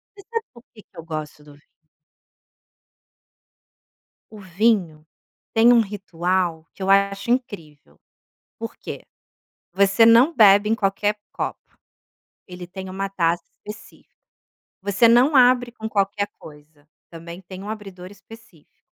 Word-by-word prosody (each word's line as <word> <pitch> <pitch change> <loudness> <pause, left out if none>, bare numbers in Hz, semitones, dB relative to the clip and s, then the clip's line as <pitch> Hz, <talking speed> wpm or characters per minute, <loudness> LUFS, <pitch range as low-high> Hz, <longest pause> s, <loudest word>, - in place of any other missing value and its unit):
Você 400 - -14
sabe 455 -1 -2
porque 235 -2 -18
que - - -26
eu 165 - -9
gosto 155 -2 -7
do 145 -1 -16
vinho? 145 - -22 2.6
O 215 -1 -13
vinho 185 -5 0 0.5
tem 230 +2 +5
um 235 - +5
ritual 180 -4 -2
que 195 - -16
eu 195 - -2
acho 200 +2 +2
incrível, 155 - -5 0.6
por - - -7
quê? - - -9 0.7
Você 200 +3 +4
não 240 +8 +5
bebe 205 -3 +6
em - - +3
qualquer 205 0 -1 0.2
copo, - - -4 0.9
ele 180 0 -9
tem 190 +1 -8
uma 195 +1 -4
taça 170 -3 0
específica, 210 0 -13 0.7
você 200 +4 +3
não 250 +6 +4
abre 245 -1 +4
com 220 -2 -7
qualquer 200 0 -1
coisa, 150 -1 -16 0.2
também 170 +2 -10
tem 185 +1 -11
um 205 - -7
abridor 195 -4 -9
específico. 205 -5 -18
195 Hz, 130 wpm, -22 LUFS, 170-220 Hz, 2.6 s, bebe